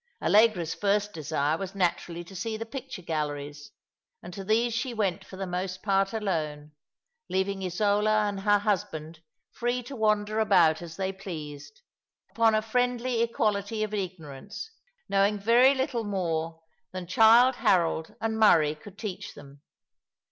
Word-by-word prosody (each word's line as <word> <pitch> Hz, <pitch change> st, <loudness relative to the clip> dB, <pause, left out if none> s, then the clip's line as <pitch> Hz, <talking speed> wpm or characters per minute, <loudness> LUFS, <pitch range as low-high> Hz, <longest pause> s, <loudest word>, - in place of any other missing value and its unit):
Allegra's 205 Hz, -6 st, +3 dB
first 205 Hz, 0 st, 0 dB
desire 155 Hz, 0 st, -1 dB
was 195 Hz, 0 st, -6 dB
naturally 175 Hz, -2 st, -1 dB
to 190 Hz, +3 st, -13 dB
see 220 Hz, +3 st, -3 dB
the 225 Hz, -, -5 dB
picture 260 Hz, -5 st, -8 dB
galleries, 145 Hz, -2 st, -4 dB, 0.5 s
and 180 Hz, -, -9 dB
to 195 Hz, 0 st, -6 dB
these 225 Hz, +3 st, +1 dB
Bhe 250 Hz, -3 st, -4 dB
went 195 Hz, -6 st, -1 dB
for 190 Hz, -, -12 dB
the 195 Hz, -, -3 dB
most 185 Hz, +1 st, -4 dB
part 195 Hz, -1 st, +2 dB
alone, 155 Hz, -9 st, -3 dB, 0.6 s
leaving 190 Hz, +1 st, -1 dB
Isola 210 Hz, +3 st, +2 dB
and 200 Hz, -1 st, -3 dB
her 205 Hz, +1 st, +3 dB
husband 165 Hz, -6 st, -3 dB, 0.3 s
free 245 Hz, +1 st, -2 dB
to 270 Hz, +3 st, -8 dB
wander 215 Hz, -1 st, +1 dB
about 170 Hz, -7 st, +4 dB
as 165 Hz, -2 st, -8 dB
they 190 Hz, 0 st, -2 dB
pleased, 185 Hz, -, -9 dB, 0.5 s
upon 225 Hz, -1 st, +3 dB
a 215 Hz, -, +1 dB
friendly 245 Hz, +1 st, 0 dB
equality 215 Hz, -2 st, 0 dB
of 215 Hz, 0 st, -4 dB
ignorance, 185 Hz, -, -6 dB, 0.4 s
knowing 200 Hz, +1 st, +2 dB
very 240 Hz, +6 st, +5 dB
little 260 Hz, -3 st, -1 dB
more 165 Hz, -5 st, -3 dB, 0.3 s
than 185 Hz, -1 st, -6 dB
Childe 230 Hz, +7 st, +5 dB
Harold 165 Hz, -3 st, +1 dB
and 220 Hz, 0 st, -2 dB
Murray 160 Hz, -8 st, +5 dB
could 185 Hz, +6 st, -14 dB
teach 205 Hz, -2 st, -6 dB
them. 140 Hz, 0 st, -14 dB
195 Hz, 150 wpm, -27 LUFS, 170-220 Hz, 0.6 s, very